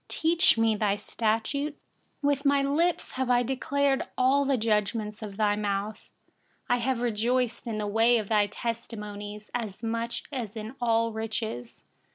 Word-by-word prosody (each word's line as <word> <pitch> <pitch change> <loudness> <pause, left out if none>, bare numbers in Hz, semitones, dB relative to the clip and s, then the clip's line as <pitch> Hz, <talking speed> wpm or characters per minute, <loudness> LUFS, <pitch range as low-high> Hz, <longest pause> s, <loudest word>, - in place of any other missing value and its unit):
Teach 335 -3 +3
me 225 -1 +3
your 205 -1 +1
statutes. 230 +8 -1 0.4
13With 280 -1 +2
my 280 -1 +4
lips, 305 0 0
I - - +3
have 245 0 +3
declared 270 +2 +1 0.2
all 270 +2 +4
the 275 - +2
ordinances 215 -2 0
of - - -14
your 210 -1 +3
mouth. 205 +1 -3 0.6
14I 245 - +4
have 245 0 0
rejoiced 240 +1 0
in 220 -2 -2
the 210 - -2
way 225 +3 +4
of 215 -1 -4
your 210 -1 +4
testimonies, 210 -2 -6
as 220 -3 -4
much 230 +1 -2
as 235 -6 -4
in 220 +2 -6
all 230 -1 +2
riches. 220 - -4
230 Hz, 155 wpm, -28 LUFS, 210-255 Hz, 0.6 s, my